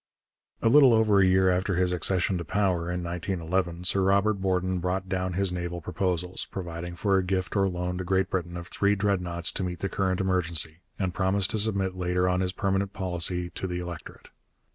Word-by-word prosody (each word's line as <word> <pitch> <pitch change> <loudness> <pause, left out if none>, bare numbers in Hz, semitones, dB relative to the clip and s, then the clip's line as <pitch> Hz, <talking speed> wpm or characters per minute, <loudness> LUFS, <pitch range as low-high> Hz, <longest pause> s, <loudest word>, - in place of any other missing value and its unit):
A - - +4
little 130 -1 +7
over 110 -3 +4
a 95 - +5
year 95 0 +4
after 95 +1 0
his 90 0 +2
accession 90 +1 +1
to - - -4
power 90 -2 0
in 90 0 -3
1911, 85 0 -2
Sir 95 +1 +1
Robert 100 +1 +2
Borden 95 -1 0
brought 90 +2 -2
down 95 -1 -2
his 95 0 +1
naval 85 -1 -4
proposals, 90 +1 -2
providing 85 -2 -6
for 95 +2 +2
a - - -1
gift 95 +1 -2
or 95 -1 +3
loan 90 0 -3
to - - -2
Great 95 +1 0
Britain 85 -1 -2
of 85 - -7
three 100 +3 +1
Dreadnoughts 90 -4 0
to - - -3
meet 90 -1 -3
the 95 - -3
current 95 -2 0
emergency, 85 -4 0 0.2
and 95 -3 -2
promised 95 +2 +1
to 110 - -1
submit 100 -3 0
later 90 0 0
on 90 0 +1
his 90 -1 0
permanent 95 +1 -1
policy 90 -2 -1
to 95 - -4
the 90 -1 -3
electorate. 85 -2 -8
90 Hz, 200 wpm, -27 LUFS, 90-95 Hz, 0.2 s, little